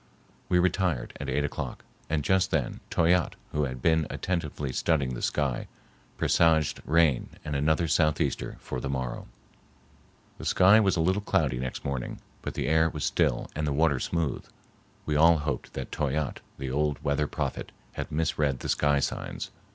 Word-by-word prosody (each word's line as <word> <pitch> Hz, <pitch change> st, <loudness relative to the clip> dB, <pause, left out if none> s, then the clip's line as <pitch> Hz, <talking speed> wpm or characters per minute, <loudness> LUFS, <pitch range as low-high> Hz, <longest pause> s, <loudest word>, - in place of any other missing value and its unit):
We 90 Hz, -, +4 dB
retired 90 Hz, -6 st, +1 dB
at -, -, -4 dB
eight 75 Hz, -, +1 dB
o'clock, 75 Hz, -, -5 dB, 0.2 s
and 75 Hz, -1 st, 0 dB
just 95 Hz, +3 st, +2 dB
then -, -, -1 dB
Toyatte, 85 Hz, +1 st, +2 dB, 0.2 s
who 75 Hz, -1 st, +1 dB
had 65 Hz, -1 st, -6 dB
been 80 Hz, -2 st, +3 dB
attentively 75 Hz, -6 st, -3 dB
studying 70 Hz, -6 st, +1 dB
the -, -, -5 dB
sky, 70 Hz, -5 st, -1 dB, 0.5 s
presaged 80 Hz, -3 st, +3 dB
rain 80 Hz, -5 st, +3 dB, 0.2 s
and 75 Hz, -1 st, -3 dB
another 80 Hz, +4 st, +2 dB
southeaster 75 Hz, -1 st, +1 dB
for 65 Hz, -, -4 dB
the 70 Hz, -, -3 dB
morrow. 65 Hz, -2 st, -3 dB, 1.1 s
The -, -, -7 dB
sky 100 Hz, +4 st, +6 dB
was 100 Hz, -3 st, +3 dB
a 85 Hz, -, +1 dB
little 95 Hz, +5 st, +2 dB
cloudy 75 Hz, -12 st, +1 dB
next 65 Hz, 0 st, -4 dB
morning, 70 Hz, -3 st, -3 dB, 0.2 s
but -, -, -5 dB
the -, -, -1 dB
air 80 Hz, +1 st, +4 dB
was 75 Hz, -4 st, -3 dB
still -, -, +1 dB
and 75 Hz, 0 st, -1 dB
the -, -, 0 dB
water 75 Hz, -2 st, +2 dB
smooth. 80 Hz, -3 st, -1 dB, 0.6 s
We 75 Hz, -, 0 dB
all 80 Hz, +2 st, +6 dB
hoped 75 Hz, -1 st, -3 dB
that 65 Hz, -, -5 dB
Toyatte, 75 Hz, 0 st, -1 dB, 0.2 s
the 65 Hz, -1 st, -4 dB
old 75 Hz, +1 st, +1 dB
weather 70 Hz, +1 st, +1 dB
prophet, -, -, -3 dB, 0.2 s
had -, -, -5 dB
misread 75 Hz, -3 st, 0 dB
the -, -, -4 dB
sky 70 Hz, -1 st, +2 dB
signs. -, -, -3 dB
75 Hz, 165 wpm, -28 LUFS, 70-80 Hz, 1.1 s, sky